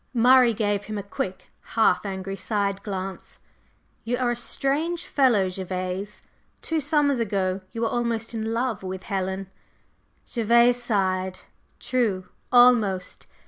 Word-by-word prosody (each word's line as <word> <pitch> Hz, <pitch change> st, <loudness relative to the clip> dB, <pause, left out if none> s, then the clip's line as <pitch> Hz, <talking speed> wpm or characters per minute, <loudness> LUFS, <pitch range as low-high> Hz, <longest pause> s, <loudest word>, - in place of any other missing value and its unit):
Murray 245 Hz, 0 st, +6 dB
gave 205 Hz, -1 st, 0 dB
him 215 Hz, -1 st, -5 dB
a 200 Hz, -, -4 dB
quick, 190 Hz, -2 st, -5 dB
half 220 Hz, -2 st, +2 dB
angry 195 Hz, 0 st, -4 dB
side 200 Hz, +1 st, -1 dB
glance. 190 Hz, -2 st, -5 dB, 0.6 s
"You 245 Hz, +2 st, -1 dB
are 245 Hz, -1 st, +1 dB
a -, -, -1 dB
strange 300 Hz, +8 st, -1 dB
fellow, 240 Hz, -9 st, +3 dB
Gervase. 185 Hz, +2 st, -4 dB, 0.4 s
Two 325 Hz, -1 st, -1 dB
summers 290 Hz, -2 st, +2 dB
ago 195 Hz, -4 st, -1 dB
you 230 Hz, -, -5 dB
were 230 Hz, -, +2 dB
almost 235 Hz, -1 st, -2 dB
in 220 Hz, 0 st, -2 dB
love 230 Hz, -3 st, -1 dB
with 190 Hz, 0 st, -6 dB
Helen." 190 Hz, -1 st, -3 dB, 0.7 s
Gervase 235 Hz, +1 st, +3 dB
sighed. 190 Hz, -5 st, 0 dB, 0.4 s
"True. 215 Hz, -8 st, -1 dB, 0.2 s
Almost. 225 Hz, -7 st, +4 dB
215 Hz, 130 wpm, -25 LUFS, 190-240 Hz, 0.7 s, Murray